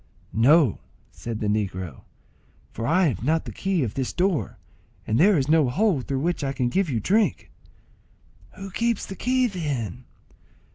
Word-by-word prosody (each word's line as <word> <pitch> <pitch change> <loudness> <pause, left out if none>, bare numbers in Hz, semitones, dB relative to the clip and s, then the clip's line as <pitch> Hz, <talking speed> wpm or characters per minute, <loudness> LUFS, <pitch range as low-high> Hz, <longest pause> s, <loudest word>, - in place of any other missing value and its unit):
"No," 135 - +4 0.3
said 105 +9 -6
the 105 - -1
negro, 95 -7 -3 0.7
"for 115 - -4
I 180 +5 +3
have 110 -5 -5
not 160 +4 +1
the - - -6
key 190 -5 -1
of 110 - -3
this 130 -2 -2
door, 180 -3 0 0.5
and 110 +3 0
there 195 +2 +5
is 135 -1 0
no 155 -4 +4
hole 185 - +1
through 135 +1 -3
which 170 0 -1
I 135 0 -1
can 125 -2 0
give 190 +5 0
you 120 -5 0
drink." 210 - +1 1.0
"Who 195 0 -8
keeps 230 +2 -1
the 195 - -8
key, 255 +5 +1
then?" 140 - -3
145 Hz, 170 wpm, -24 LUFS, 115-190 Hz, 1.0 s, there